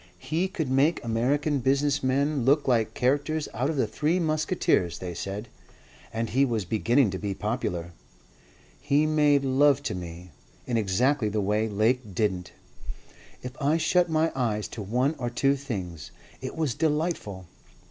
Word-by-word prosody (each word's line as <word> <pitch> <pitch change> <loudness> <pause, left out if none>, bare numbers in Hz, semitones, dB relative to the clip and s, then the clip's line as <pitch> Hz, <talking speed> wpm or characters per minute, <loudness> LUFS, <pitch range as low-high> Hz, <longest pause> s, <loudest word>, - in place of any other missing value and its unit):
"He 160 - -1
could 165 -6 -3
make 135 +6 +2
American 140 +6 +1
business 140 +3 +1
men 140 +1 +1
look 140 +4 +3
like 115 -4 +1
characters 145 +4 0
out 125 +5 -1
of 160 - -1
the 130 - +2
Three 150 +11 0
Musketeers, 155 - +1
they 90 -1 -6
said, 100 +6 -5 0.6
and 115 0 -3
he 135 +3 +3
was 115 -7 0
beginning 115 +4 +2
to 95 - -4
be 100 -2 -3
popular. 90 -6 -3 0.9
He 145 +2 +2
made 150 -2 +3
love 140 +1 +3
to - - -2
me. 90 0 -8 0.3
In 120 - -2
exactly 115 +4 +1
the 105 +1 -1
way 105 +2 0
Lake 110 0 0
didn't. 95 -3 -1 0.9
If 125 - -5
I 145 +3 +3
shut 180 +1 +2
my 160 +1 +2
eyes 110 -5 -1
to 115 - -7
one 125 +9 0
or 120 -1 -2
two 135 +3 +2
things, 95 - -6 0.3
it - - -5
was 155 -6 0
delightful. 150 - -1
130 Hz, 160 wpm, -26 LUFS, 105-145 Hz, 0.9 s, look